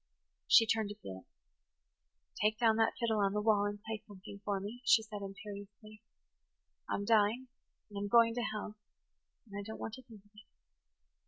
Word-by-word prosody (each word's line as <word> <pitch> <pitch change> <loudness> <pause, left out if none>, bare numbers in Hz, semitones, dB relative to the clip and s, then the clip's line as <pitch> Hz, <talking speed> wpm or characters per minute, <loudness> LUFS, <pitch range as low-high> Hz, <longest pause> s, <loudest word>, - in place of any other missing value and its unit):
She 225 - +7
turned 220 -1 +1
to 210 - -6
Felix. 95 - -10 1.1
"Take 215 +1 +2
down 225 -1 +3
that 225 0 +3
fiddle 225 -3 +1
on 200 -1 +2
the 210 - 0
wall 210 -2 +3
and 205 0 -4
play 220 -1 -5
something 200 0 -11
for 200 -1 -1
me," 210 +5 -7
she 225 - +5
said 210 -2 -7
imperiously. 205 +1 -9 0.9
"I'm 200 - -1
dying–and 225 +1 -1
I'm 205 - -2
going 230 +2 +5
to 240 - -2
hell–and 210 0 -9
I 205 - -3
don't 220 +2 -7
want 220 - -5
to 260 - -8
think 220 -5 -16
of 205 - -26
it. 210 -1 -16
210 Hz, 170 wpm, -34 LUFS, 205-225 Hz, 1.1 s, She